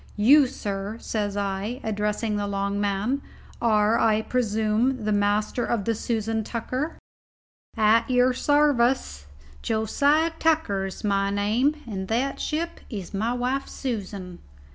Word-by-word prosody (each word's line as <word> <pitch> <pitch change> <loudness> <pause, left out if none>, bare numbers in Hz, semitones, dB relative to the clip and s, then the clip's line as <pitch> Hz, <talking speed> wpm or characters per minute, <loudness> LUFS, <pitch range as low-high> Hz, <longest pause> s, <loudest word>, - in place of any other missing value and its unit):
You, 270 +7 +6
sir," 205 -4 -4
says 205 -2 -2
I, 200 +4 -2
addressing 210 0 -1
the 205 0 -1
long 200 0 -1
man, 205 +7 0 0.4
"are, 215 -1 +3
I 220 -1 +3
presume, 220 +1 0
the 215 - +1
master 205 +3 +1
of 220 -5 -1
the 230 - +1
Susan 220 0 -2
Tucker?" 255 +8 -3 0.8
"At 220 +2 +4
your 250 0 +4
sarvice 255 - +2 0.3
Josiah 285 +9 +2
Tucker 305 -13 +1
is 190 - -9
my 200 -1 +1
name, 230 +10 +1
and 190 -5 -5
that 250 +6 -1
ship 330 +2 -3
is 200 -6 -6
my 220 +5 0
wife 250 +3 -1
Susan." 200 -8 -5
220 Hz, 130 wpm, -25 LUFS, 205-255 Hz, 0.8 s, You